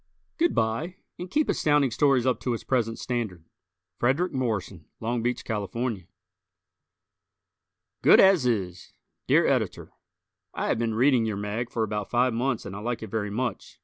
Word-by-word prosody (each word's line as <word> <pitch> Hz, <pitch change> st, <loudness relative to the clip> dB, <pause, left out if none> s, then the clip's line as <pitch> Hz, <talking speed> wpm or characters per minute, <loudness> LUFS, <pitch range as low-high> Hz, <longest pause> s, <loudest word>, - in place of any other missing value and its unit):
Good 340 Hz, +1 st, +2 dB
by, 115 Hz, +12 st, -1 dB, 0.2 s
and 180 Hz, -, -6 dB
keep 305 Hz, +9 st, +1 dB
Astounding 145 Hz, -4 st, +2 dB
Stories 135 Hz, -1 st, +3 dB
up 130 Hz, -, +1 dB
to 125 Hz, -2 st, -1 dB
its -, -, -8 dB
present 115 Hz, -3 st, 0 dB
standard. 110 Hz, -10 st, -4 dB, 0.5 s
Frederick 145 Hz, +9 st, +1 dB
Morrison, 105 Hz, -, -3 dB
Long 115 Hz, +1 st, -2 dB
Beach, 125 Hz, +2 st, -2 dB
Calif. 105 Hz, -1 st, -3 dB, 1.9 s
"Good -, -, +7 dB
As 190 Hz, -9 st, +5 dB
Is" 95 Hz, -7 st, -2 dB, 0.3 s
Dear -, -, +4 dB
Editor: -, -, -1 dB, 0.6 s
I -, -, -2 dB
have -, -, +1 dB
been 115 Hz, -2 st, -1 dB
reading 125 Hz, -1 st, +3 dB
your 105 Hz, -2 st, -2 dB
mag 105 Hz, +4 st, -3 dB
for 115 Hz, -, -1 dB
about 105 Hz, -1 st, -3 dB
five 125 Hz, 0 st, +2 dB
months 120 Hz, +1 st, -1 dB
and 100 Hz, -1 st, -7 dB
I -, -, -6 dB
like 115 Hz, +1 st, -3 dB
it 110 Hz, -, -8 dB
very 110 Hz, -2 st, -2 dB
much. 120 Hz, +4 st, -4 dB
120 Hz, 160 wpm, -26 LUFS, 110-130 Hz, 1.9 s, Good